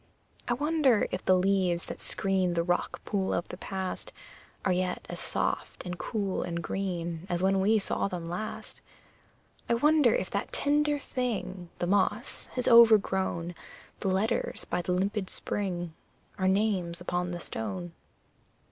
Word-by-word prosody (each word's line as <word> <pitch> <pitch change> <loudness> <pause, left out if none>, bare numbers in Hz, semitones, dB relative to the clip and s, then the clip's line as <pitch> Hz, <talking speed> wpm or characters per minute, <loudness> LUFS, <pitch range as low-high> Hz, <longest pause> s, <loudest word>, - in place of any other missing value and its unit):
I 240 - +2
wonder 290 -5 +3
if 185 - -3
the 185 - +5
leaves 185 -2 +2
that - - -7
screen 190 -2 +1
The 170 - +2
rock 175 +1 -1
pool 195 -3 0
of 170 - -2
the 180 - -7
past 190 -1 -4 0.5
Are 185 - +3
yet 180 0 -1
as - - -5
soft - - -2
and 180 0 -3
cool 200 -4 -2
and 170 -1 -3
green 175 -2 -3
As 175 +1 +1
when 195 0 +3
we 215 +3 +4
saw 200 - 0
them 175 -3 -5
last! 180 +6 -5 0.9
I 235 - +4
wonder 295 -1 +4
if 185 - -2
that 200 - -2
tender 295 +1 +2
thing, 215 -10 -3
The - - -1
moss, 205 +5 0
has 250 - -1
overgrown 195 -7 +5 0.5
The - - -2
letters 200 +5 0
by - - -1
the 180 - -2
limpid 195 +2 0
spring 175 -5 -3 0.5
Our 185 - +2
names 190 -4 +1
upon 180 0 -2
the 175 -1 -4
stone! 95 - -4
190 Hz, 155 wpm, -29 LUFS, 175-215 Hz, 0.9 s, the